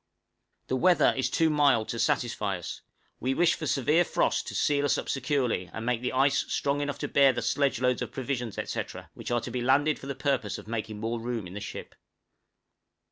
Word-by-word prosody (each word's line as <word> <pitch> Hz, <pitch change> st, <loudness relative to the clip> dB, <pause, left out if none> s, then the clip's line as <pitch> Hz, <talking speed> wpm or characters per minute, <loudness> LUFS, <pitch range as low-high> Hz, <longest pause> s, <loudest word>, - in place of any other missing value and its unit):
The -, -, -1 dB
weather 180 Hz, +6 st, +4 dB
is 130 Hz, -, 0 dB
too 160 Hz, -1 st, +2 dB
mild 140 Hz, -7 st, +3 dB
to 115 Hz, -, -3 dB
satisfy 105 Hz, -4 st, 0 dB
us; 85 Hz, -, -7 dB, 0.4 s
we 130 Hz, +2 st, -1 dB
wish 175 Hz, +2 st, +4 dB
for 155 Hz, -, -4 dB
severe 150 Hz, +6 st, +3 dB
frost -, -, 0 dB
to -, -, -6 dB
seal 145 Hz, -1 st, +2 dB
us 145 Hz, -, +2 dB
up -, -, -4 dB
securely, 130 Hz, -8 st, 0 dB
and 115 Hz, -, -6 dB
make 120 Hz, -1 st, 0 dB
the 125 Hz, -, -1 dB
ice 135 Hz, +2 st, +3 dB
strong 140 Hz, +1 st, 0 dB
enough 145 Hz, 0 st, -2 dB
to -, -, -1 dB
bear 140 Hz, -2 st, +5 dB
the 120 Hz, -, -3 dB
sledge 140 Hz, -3 st, +1 dB
loads 125 Hz, -1 st, +1 dB
of -, -, -4 dB
provisions, 125 Hz, -4 st, -3 dB
etc., -, -, -5 dB
which -, -, -7 dB
are 120 Hz, -1 st, +1 dB
to 120 Hz, -, -6 dB
be 125 Hz, +1 st, -2 dB
landed 140 Hz, +5 st, +3 dB
for 135 Hz, -, -9 dB
the 140 Hz, -, -3 dB
purpose 135 Hz, -6 st, -1 dB
of -, -, -11 dB
making 110 Hz, -2 st, -4 dB
more 115 Hz, +2 st, -2 dB
room 115 Hz, -3 st, -3 dB
in 90 Hz, -, -9 dB
the 105 Hz, -, -6 dB
ship. 105 Hz, -, -7 dB
130 Hz, 215 wpm, -28 LUFS, 115-140 Hz, 0.4 s, bear